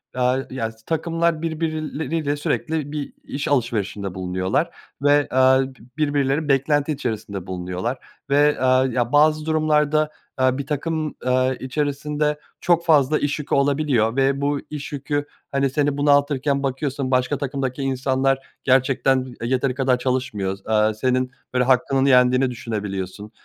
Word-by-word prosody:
aaa, 125 Hz, 0 st, +2 dB
ya, 115 Hz, -4 st, -3 dB
s 110 Hz, -, -22 dB
takımlar 165 Hz, 0 st, 0 dB
birbirleriyle 160 Hz, -1 st, -2 dB
sürekli 150 Hz, 0 st, -2 dB
bir 150 Hz, -2 st, -5 dB
iş 140 Hz, +1 st, -4 dB
alışverişinde 105 Hz, -7 st, -1 dB
bulunuyorlar 95 Hz, -, -1 dB, 0.3 s
ve, 145 Hz, 0 st, +4 dB
aaa, 130 Hz, +1 st, +5 dB
bi 135 Hz, 0 st, -7 dB, 0.2 s
birbirleri 145 Hz, 0 st, +1 dB
beklenti 145 Hz, +2 st, +2 dB
içerisinde 110 Hz, -, -4 dB
bulunuyorlar 90 Hz, +7 st, -3 dB, 0.3 s
ve, 145 Hz, +1 st, +3 dB
aaa, 130 Hz, 0 st, +4 dB
ya, 120 Hz, -1 st, -1 dB
bazı 155 Hz, +1 st, +4 dB
durumlarda, 155 Hz, -1 st, +2 dB, 0.3 s
aaa, 130 Hz, 0 st, +2 dB
bir 140 Hz, -, -4 dB
takım, 155 Hz, +1 st, -2 dB
aaa, 130 Hz, +1 st, +2 dB
içerisinde 150 Hz, +2 st, -2 dB, 0.2 s
çok 170 Hz, -1 st, +2 dB
fazla 150 Hz, -2 st, +4 dB
iş 145 Hz, +1 st, -1 dB
yükü 150 Hz, -, -1 dB
olabiliyor 140 Hz, -5 st, +2 dB
ve 135 Hz, +1 st, +2 dB
bu 145 Hz, 0 st, 0 dB
iş 150 Hz, -1 st, -6 dB
yükü, 145 Hz, +1 st, -2 dB, 0.3 s
hani, 140 Hz, 0 st, +1 dB
seni 145 Hz, +1 st, 0 dB
bunaltırken 145 Hz, -1 st, +2 dB
bakıyorsun 135 Hz, 0 st, -2 dB
başka 125 Hz, +2 st, +1 dB
takımdaki 135 Hz, -1 st, -3 dB
insanlar 135 Hz, 0 st, +1 dB, 0.2 s
gerçekten 130 Hz, 0 st, +2 dB
b -, -, -9 dB, 0.2 s
yeteri 130 Hz, 0 st, 0 dB
kadar 130 Hz, -1 st, +2 dB
çalışmıyor. 125 Hz, -7 st, -1 dB
S -, -, -24 dB
aaa, 110 Hz, 0 st, +3 dB
senin, 130 Hz, +3 st, 0 dB, 0.2 s
böyle, 125 Hz, 0 st, +3 dB
hakkının 135 Hz, +1 st, +2 dB
yendiğini 125 Hz, -1 st, +4 dB
düşünebiliyorsun. 105 Hz, -3 st, -5 dB
135 Hz, 140 wpm, -22 LUFS, 125-145 Hz, 0.3 s, aaa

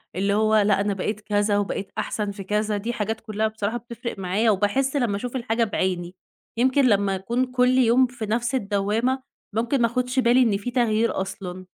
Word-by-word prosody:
اللي 200 Hz, +2 st, +1 dB
هو 215 Hz, +1 st, +3 dB
لأ، 205 Hz, -1 st, +3 dB
أنا 205 Hz, 0 st, 0 dB
بقيت 210 Hz, +3 st, -3 dB
كذا، 205 Hz, 0 st, +1 dB
وبقيت 200 Hz, -1 st, -3 dB
أحسن 210 Hz, -2 st, -2 dB
في 200 Hz, 0 st, -8 dB
كذا، 210 Hz, +2 st, 0 dB
دي 225 Hz, +4 st, -3 dB
حاجات 220 Hz, -1 st, -3 dB
كُلّها 215 Hz, 0 st, -1 dB
بصراحة 220 Hz, +1 st, -3 dB
بتفرِق 235 Hz, -1 st, -7 dB
معايا، 195 Hz, +5 st, +1 dB
وباحِسّ 210 Hz, +8 st, 0 dB
لمّا 240 Hz, -7 st, +1 dB
أشوف 245 Hz, +5 st, -5 dB
الحاجة 235 Hz, -2 st, 0 dB
بِعِيني، 185 Hz, -4 st, -2 dB, 0.4 s
يمكن 260 Hz, +3 st, +3 dB
لمّا 200 Hz, -4 st, +2 dB
أكون 235 Hz, +7 st, -1 dB
كُلّ 250 Hz, 0 st, +2 dB
يوم 255 Hz, +1 st, +4 dB
في 245 Hz, -2 st, -6 dB
نفس 240 Hz, +4 st, -1 dB
الدّوّامة، 220 Hz, +4 st, 0 dB, 0.3 s
ممكن 240 Hz, +4 st, +1 dB
ما 235 Hz, -, +4 dB
آخُدش 250 Hz, +2 st, -1 dB
بالي 245 Hz, +1 st, +4 dB
إن 215 Hz, -4 st, +2 dB
في 230 Hz, +5 st, -5 dB
تَغيير 230 Hz, -4 st, +1 dB
أصلًا، 185 Hz, -1 st, -6 dB
220 Hz, 190 wpm, -24 LUFS, 200-245 Hz, 0.4 s, يوم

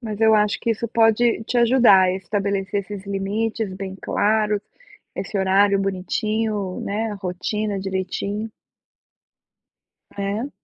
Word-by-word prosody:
Mas 215 Hz, -4 st, -5 dB
eu 220 Hz, 0 st, +5 dB
acho 210 Hz, -1 st, +2 dB
que 235 Hz, -, -1 dB
isso 230 Hz, +1 st, -2 dB
pode 225 Hz, 0 st, +3 dB
te 245 Hz, -, 0 dB
ajudar 235 Hz, -5 st, +6 dB
a 180 Hz, -, +2 dB
estabelecer 195 Hz, +1 st, -2 dB
esses 200 Hz, 0 st, -8 dB
limites 205 Hz, +2 st, -2 dB
bem 190 Hz, 0 st, -6 dB
claros, 210 Hz, 0 st, +1 dB, 0.5 s
esse 195 Hz, +2 st, -4 dB
horário 195 Hz, +1 st, +3 dB
bonitinho, 195 Hz, +1 st, -2 dB
né, 215 Hz, +3 st, -2 dB
a -, -, -4 dB
rotina 200 Hz, +2 st, -3 dB
direitinho. 195 Hz, +3 st, -3 dB, 1.7 s
Né? 200 Hz, +6 st, -2 dB
205 Hz, 125 wpm, -22 LUFS, 195-220 Hz, 1.7 s, ajudar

